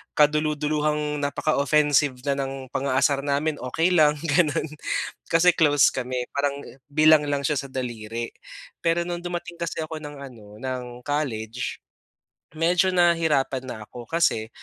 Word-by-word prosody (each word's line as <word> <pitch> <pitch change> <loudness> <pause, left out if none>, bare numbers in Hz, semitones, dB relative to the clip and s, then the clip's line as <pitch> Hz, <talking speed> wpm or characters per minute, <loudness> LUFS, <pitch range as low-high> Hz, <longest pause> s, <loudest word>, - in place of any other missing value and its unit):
kadululuhang 150 0 +1
napaka-offensive 145 -1 +2
na 140 -1 0
ng 135 -1 -5
pang-aasar 140 +1 +1
namin, 145 +2 0
okey 160 +8 0
lang 150 -3 +5
gano'n, 160 0 +1 0.6
kasi 170 +2 +6
close 145 -4 +4
kami. 125 -1 -3
Parang 140 0 -1 0.3
bilang 155 +1 +5
lang 140 -1 -1
siya 145 0 +1
sa 140 - -6
daliri. 115 -2 -4 0.5
Pero 170 0 +2
no'ng 175 -1 -3
dumating 175 -1 -5
kasi 170 -1 -3
ako 155 0 -6
ng 145 0 -7
ano, 110 -6 -12
ng 125 -1 -5
college, 125 -5 -3 0.8
medyo 175 +3 +3
nahirapan 165 -7 +2
na 125 - -6
ako 120 +1 -11
kasi, 140 -10 +1
145 Hz, 130 wpm, -24 LUFS, 130-155 Hz, 0.8 s, kasi